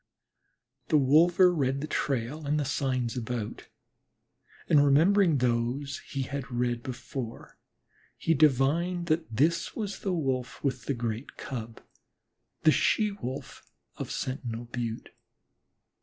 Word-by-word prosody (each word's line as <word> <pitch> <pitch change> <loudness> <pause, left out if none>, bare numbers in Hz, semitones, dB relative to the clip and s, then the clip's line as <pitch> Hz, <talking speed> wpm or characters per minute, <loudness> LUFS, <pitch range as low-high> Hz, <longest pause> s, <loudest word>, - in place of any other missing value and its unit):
The 155 - +4
wolver 170 +6 +5
read 135 -4 0
the 145 - -3
trail 145 0 -2
and 150 +1 +1
the 145 - 0
signs 130 -4 -1
about, 120 -3 -4 1.0
and 145 -2 +5
remembering 165 +4 +4
those 125 +3 0
he 135 -1 -2
had 140 0 -5
read 120 -1 0
before, 125 -1 -7 0.6
he 165 - +2
divined 155 +5 +2
that 160 +1 +1
this 155 +9 +1
was 210 -3 -4
the 195 - -2
Wolf 130 -7 -2
with 130 -3 -1
the 140 - -1
great 115 +1 -4
Cub 115 -3 -6 0.8
the 155 - +7
She 210 +6 +2
wolf 135 -8 -6 0.3
of - - -5
Sentinel 120 -3 -4
Butte. 115 -1 -4
135 Hz, 125 wpm, -28 LUFS, 120-155 Hz, 1.0 s, the